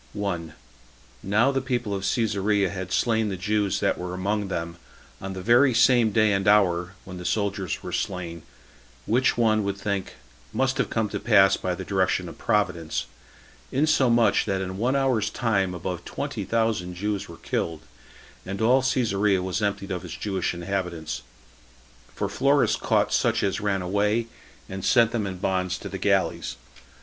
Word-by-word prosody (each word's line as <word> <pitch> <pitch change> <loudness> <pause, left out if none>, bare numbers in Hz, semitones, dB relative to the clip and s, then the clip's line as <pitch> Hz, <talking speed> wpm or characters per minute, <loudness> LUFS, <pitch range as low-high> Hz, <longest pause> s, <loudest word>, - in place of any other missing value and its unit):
1. 90 -6 -3 0.7
Now 110 +8 +2
the 135 -1 0
people 120 -5 -2
of 95 -1 -3
Cesarea 105 -4 +1
had 95 -2 -6
slain 110 -1 +1
the 95 - -3
Jews 100 +1 0
that - - +1
were 90 0 -4
among 100 +2 -1
them 85 -2 -4 0.4
on 95 0 -5
the 95 -1 -6
very 120 +3 +5
same 120 -2 +5
day 110 0 +3
and 95 0 0
hour 90 -3 +3
[when 90 -1 -8
the - - -7
soldiers 100 -3 -2
were - - -6
slain], 85 -3 -3 0.6
which 125 +3 +2
one 110 -2 +3
would 100 0 -2
think 100 -1 -3 0.4
must 130 0 0
have - - +1
come 110 -1 0
to - - -3
pass 100 -4 +5
by 90 -1 -2
the - - -7
direction 95 -2 0
of - - -10
Providence; 80 -2 0 0.7
insomuch 130 -5 +3
that 95 -2 -1
in 95 0 -4
one 125 +4 +1
hour's 130 -6 +1
time 100 -6 0
above 90 0 -4
twenty - - -4
thousand 110 -6 0
Jews 100 +2 -3
were - - -10
killed, 80 -2 -3 0.6
and 95 +1 -5
all 125 +4 +4
Cesarea 105 -7 +1
was 95 +3 -2
emptied 100 -1 -2
of 90 -1 -3
its 85 -3 -7
Jewish 95 -4 -2
inhabitants; 85 -3 -3 0.9
for - - -1
Florus 140 +1 +2
caught - - +1
such - - +2
as 100 +1 0
ran 100 -2 0
away, 105 +5 +1 0.4
and 95 0 -6
sent 115 -2 +4
them 110 -4 -1
in 95 -1 -5
bonds 95 0 -1
to - - -8
the - - -6
galleys. - - 0
100 Hz, 170 wpm, -25 LUFS, 95-115 Hz, 0.9 s, very